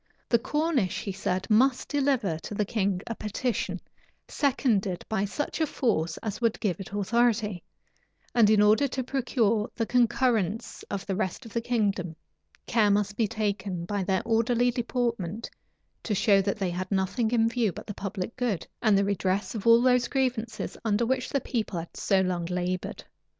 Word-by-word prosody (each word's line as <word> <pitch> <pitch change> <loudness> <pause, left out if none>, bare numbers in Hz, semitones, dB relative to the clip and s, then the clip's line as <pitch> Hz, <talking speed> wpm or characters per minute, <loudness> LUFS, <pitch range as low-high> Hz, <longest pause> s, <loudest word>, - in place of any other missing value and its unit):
The 235 - +4
Cornish, 280 - 0
he 200 - -3
said, 185 0 -2
must 250 +4 +3
deliver 265 - +1
to 205 - -7
the 210 - 0
king 200 -3 0
a 230 - -3
petition, 230 +3 -2 0.5
seconded 230 - 0
by 215 -2 0
such 290 +10 -3
a 315 - +3
force 170 - 0
as 215 +1 -4
would 230 -2 +1
give 185 -4 -1
it 195 - -8
authority; 210 -1 +1 0.7
and 230 -4 +5
in 210 -1 +5
order 215 +7 +4
to 260 0 -3
procure 235 -4 0
the 230 - 0
concurrence 235 -3 +1
of 195 - -4
the 195 - -2
rest 205 +5 -3
of 225 - -11
the 235 - 0
kingdom, 200 -8 -1 0.5
care 220 -3 +3
must 205 0 +1
be 225 -1 +1
taken, 200 -5 -2
by 200 +1 -2
their 190 0 0
orderly 240 +2 +2
deportment, 235 -5 -2 0.5
to 210 - -2
show 200 -1 +4
that 200 +2 -1
they 190 -3 -1
had 185 +1 -4
nothing 195 +4 +1
in 225 -1 +3
view 230 -3 +1
but - - -9
the 205 - -5
public 195 +2 -5
good, 245 -8 -1 0.2
and 215 -4 +4
the 200 - +2
redress 195 0 -1
of 220 0 -4
all 230 +1 +7
those 250 -1 +4
grievances 240 -5 -2
under 220 +1 +1
which 255 +1 -1
the 275 - 0
people 220 -7 -2
had 165 0 -6
so 195 -1 +2
long 180 -2 -1
labored. 180 0 -3
215 Hz, 175 wpm, -27 LUFS, 195-240 Hz, 0.7 s, all